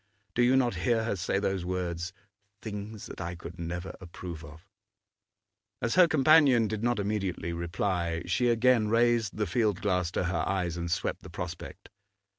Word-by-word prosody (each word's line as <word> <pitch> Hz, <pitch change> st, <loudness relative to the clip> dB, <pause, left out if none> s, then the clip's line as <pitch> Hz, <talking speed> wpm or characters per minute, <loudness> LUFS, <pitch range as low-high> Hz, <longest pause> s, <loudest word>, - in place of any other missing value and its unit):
Do 120 Hz, -, +1 dB
you 125 Hz, +2 st, +5 dB
not 125 Hz, -2 st, +2 dB
hear 115 Hz, +3 st, +2 dB
her 110 Hz, -2 st, -1 dB
say 95 Hz, +1 st, -1 dB
those 95 Hz, -2 st, -1 dB
words: 90 Hz, -1 st, -3 dB, 0.5 s
'things 105 Hz, 0 st, -6 dB
that -, -, -8 dB
I 85 Hz, 0 st, -4 dB
could 85 Hz, +1 st, -10 dB
never 85 Hz, +2 st, -4 dB
approve 85 Hz, -2 st, -8 dB
of'? 80 Hz, +4 st, -13 dB, 1.1 s
As 115 Hz, -, 0 dB
her 180 Hz, -2 st, +7 dB
companion 145 Hz, -6 st, +5 dB
did 110 Hz, 0 st, -3 dB
not 120 Hz, +1 st, +1 dB
immediately 100 Hz, -4 st, -2 dB
reply, 85 Hz, 0 st, -1 dB
she 105 Hz, +8 st, +1 dB
again 120 Hz, -1 st, +4 dB
raised 115 Hz, -1 st, +2 dB
the 105 Hz, -, +1 dB
field 105 Hz, -5 st, +1 dB
glass 90 Hz, -4 st, +1 dB
to -, -, 0 dB
her 90 Hz, +1 st, 0 dB
eyes 90 Hz, -3 st, -1 dB
and 85 Hz, 0 st, -3 dB
swept 85 Hz, -, -1 dB
the -, -, -11 dB
prospect. -, -, -7 dB
100 Hz, 170 wpm, -29 LUFS, 85-115 Hz, 1.1 s, her